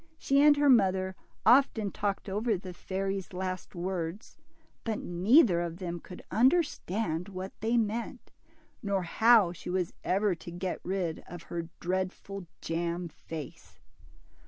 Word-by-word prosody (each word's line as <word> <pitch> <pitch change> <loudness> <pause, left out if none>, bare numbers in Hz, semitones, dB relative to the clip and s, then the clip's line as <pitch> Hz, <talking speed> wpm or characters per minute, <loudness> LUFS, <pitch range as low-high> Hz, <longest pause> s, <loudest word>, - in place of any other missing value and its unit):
She 275 -2 +3
and 295 0 +7
her 290 0 +3
mother 190 -6 +4 0.3
often 240 -6 +4
talked 200 0 -2
over 210 +2 0
the 185 0 -8
fairy's 195 0 -3
last 185 0 -4
words, 175 +2 -4 0.5
but 220 -2 -1
neither 185 - +4
of 170 -1 -4
them 175 -2 -4
could 180 +2 -11
under 265 +10 +5
stand 180 - -3
what 190 0 -6
they 225 +2 +2
meant, 230 +3 -2 0.5
nor 200 -4 0
how 220 +1 +5
she 175 - -8
was 180 -1 -1
ever 200 +1 +2
to 170 0 -9
get 175 +2 -3
rid 180 -3 -2
of 175 -1 -9
her 170 -1 -3
dreadful 185 +1 -3
jam 170 +1 -2
face. 160 -2 -9
190 Hz, 140 wpm, -30 LUFS, 175-220 Hz, 0.5 s, and